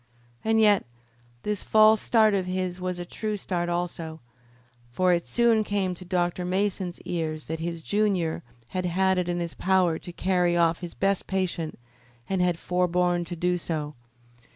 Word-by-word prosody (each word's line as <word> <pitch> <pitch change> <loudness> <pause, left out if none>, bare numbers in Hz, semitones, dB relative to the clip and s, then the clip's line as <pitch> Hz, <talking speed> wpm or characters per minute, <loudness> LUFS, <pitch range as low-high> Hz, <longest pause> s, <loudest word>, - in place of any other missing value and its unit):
And 220 0 +2
yet 210 -2 +5 0.6
this 210 -1 -2
false 215 0 +5
start 220 -3 +4
of 190 -2 0
his 185 0 -2
was 180 0 -2
a 175 - -5
true 215 +3 -3
start 175 -3 -2
also, 170 -2 -3 0.7
for 180 +8 +3
it 170 -1 -1
soon 235 -2 +3
came 200 -3 -1
to 180 - -10
Dr. 180 -1 -1
Mason's 185 -1 -1
ears 155 -3 -3
that 160 0 -4
his 170 0 -4
junior 195 -6 0 0.3
had 185 -1 -2
had 190 +1 +2
it 180 -1 -1
in 175 0 -1
his 170 -1 -3
power 185 -3 +2
to 175 - -9
carry 175 -1 +1
off 165 -1 +3
his 175 -2 -7
best 195 0 0
patient 180 -4 -2 0.5
and 190 -1 0
had 180 -2 +2
forborne 180 0 +1
to 175 - -5
do 180 +1 0
so. 155 -3 -3
180 Hz, 170 wpm, -26 LUFS, 175-190 Hz, 0.7 s, yet